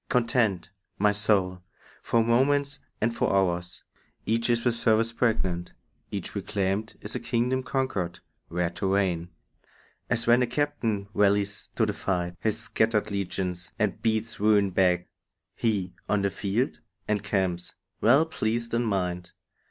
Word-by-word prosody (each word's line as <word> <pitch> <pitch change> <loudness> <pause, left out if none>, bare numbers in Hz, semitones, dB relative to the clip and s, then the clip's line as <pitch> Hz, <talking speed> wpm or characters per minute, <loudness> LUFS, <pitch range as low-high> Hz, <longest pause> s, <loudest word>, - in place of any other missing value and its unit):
Contend, 115 -6 +1 0.3
my 105 +1 +4
soul, 100 -3 +1 0.4
for 115 -1 +2
moments 140 +5 +2 0.2
and 115 +2 0
for - - +1
hours; 90 -2 0 0.4
Each 115 +2 +1
is 120 0 +1
with 120 - +3
service 115 0 +2
pregnant; 95 -7 0 0.4
each - - -5
reclaimed 100 +2 -2
Is 105 - -5
as - - -4
a - - -5
kingdom 120 +2 0
conquered, 125 -10 -2 0.3
where 85 0 -1
to 95 +2 -2
reign. 90 -4 0 0.8
As 115 -1 +1
when 120 +2 +5
a 125 - +2
captain 120 -7 -1
rallies 100 0 +2
to 110 - +3
the 105 - -1
fight 90 -3 -2
His 110 0 +1
scattered 110 -2 0
legions, 90 -2 -3
and 105 -2 -1
beats 110 0 0
ruin 105 -2 +4
back, 90 -1 +2 0.5
He, 100 -6 0 0.2
on 105 -1 +2
the 100 - +1
field, 105 - -1 0.3
encamps, 95 -4 -1 0.3
well 135 +8 +5
pleased 115 -6 -2
in 120 +1 +2
mind. 90 -4 -2
105 Hz, 145 wpm, -27 LUFS, 95-115 Hz, 0.8 s, when